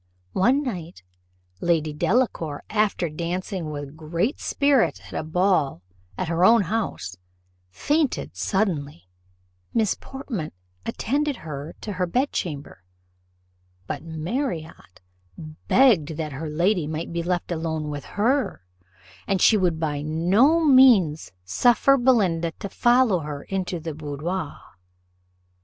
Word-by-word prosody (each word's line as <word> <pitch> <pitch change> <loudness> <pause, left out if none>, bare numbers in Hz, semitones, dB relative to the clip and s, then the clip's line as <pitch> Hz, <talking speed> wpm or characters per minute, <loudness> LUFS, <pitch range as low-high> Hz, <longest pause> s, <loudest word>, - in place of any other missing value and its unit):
One 255 +9 +3
night, 180 - -6 0.6
Lady 155 -1 +1
Delacour, 170 - 0
after 210 -4 +1
dancing 170 +2 -4
with 145 -1 -6
great 170 - -2
spirit 280 -4 +2
at - - -12
a - - -2
ball, 155 - +1 0.3
at 185 - -2
her 170 +2 +1
own 225 +2 +6
house, 165 - -3 0.5
fainted 290 - -1
suddenly: 150 - -2 0.7
Miss 220 -4 +3
Portman 240 - -6 0.3
attended 285 +4 -1
her 145 0 -6
to 210 - -5
her 180 -1 -1
bedchamber, 170 - -2 1.0
but - - -4
Marriott 160 - -5 0.7
begged 175 - +4
that 155 -2 -3
her 150 +3 -5
lady 175 +1 +1
might 160 +2 -4
be 170 - -1
left 175 +1 -2
alone 160 -2 -2
with 145 -1 -6
her, 245 - 0 0.6
and 195 -1 +1
she 220 - +6
would 180 -5 +1
by 150 -3 -1
no 195 - +3
means 240 - +5
suffer 245 - +4
Belinda 195 -11 +2
to 200 - -7
follow 240 -4 +3
her 150 -2 -6
into 185 -2 -3
the 160 0 -5
boudoir. 155 +3 -4
175 Hz, 120 wpm, -24 LUFS, 155-225 Hz, 1.0 s, own